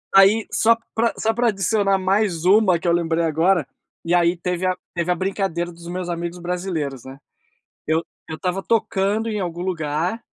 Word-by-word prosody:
Aí 200 +3 +6
só 230 +1 +4 0.2
para 230 +1 +1
só 225 0 +1
para 240 +1 +1
adicionar 195 0 +1
mais 190 -3 0
uma 190 -3 +5
que 175 - -4
eu - - +4
lembrei 170 -1 +1
agora, 165 -1 +2 0.4
e 175 +1 +2
aí 175 0 +3
teve 180 +1 -2
a 185 - +1 0.2
teve 175 +1 0
a 180 - +2
brincadeira 185 -2 -2
dos 170 0 -13
meus 180 0 -4
amigos 170 +1 -4
brasileiros, 175 -7 -3
né. 135 +1 -10 0.7
Eu 160 +1 +1 0.2
eu 160 - -5
estava 185 +3 -2
tocando 215 0 0
em 210 -2 -2
algum 175 -1 -4
lugar, 170 +4 -2
180 Hz, 180 wpm, -22 LUFS, 170-195 Hz, 0.7 s, Aí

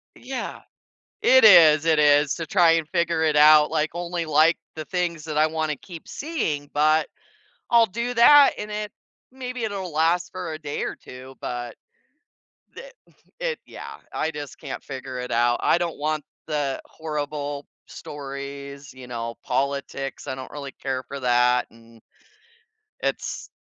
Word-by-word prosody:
Yeah. 260 +1 -6 0.6
It - - +6
is, 155 - +8
it 160 -2 +3
is 145 -1 +4
to 165 - -5
try 175 -1 +4
and 165 -2 0
figure 170 -2 0
it 155 -2 +2
out, 150 0 +7
like, 155 +1 0
only 175 -1 -3
like 155 +2 +4 0.2
the 155 - -6
things 175 -3 -2
that 155 -2 -3
I 155 - +5
wanna 155 -1 -2
keep 165 +4 -12
seeing, 160 - -3
but 155 +1 +3 0.7
I'll 235 -1 +6
do 235 +5 -3
that, 280 +4 +7
and 210 - -5
it 210 0 -4 0.4
maybe 250 -2 -6
it'll 195 -5 -4
last 165 +3 +1
for 180 -3 -5
a 155 - -7
day 145 -2 -4
or - - -3
2, 130 +1 -12
but 120 0 -5 1.0
it - - -10 0.5
it - - -2
yeah, - - -9 0.2
I 155 - -1
just 145 -2 -8
can't 140 -3 -7
figure 130 -2 -7
it 125 - -6
out. 120 +1 +2
I - - +3
don't 175 -2 -3
want 155 +1 -1 0.2
the 145 -3 -2
horrible 145 -2 -5 0.2
stories, 140 0 -8
you 130 -1 -12
know, 115 -1 -5
politics, 140 -1 -3
I - - -2
don't 130 0 -9
really 140 -2 -7
care 130 -1 -4
for 140 - -7
that, 125 0 +3
and, 115 0 -19 1.0
it's - - -3
155 Hz, 155 wpm, -24 LUFS, 140-175 Hz, 1.0 s, is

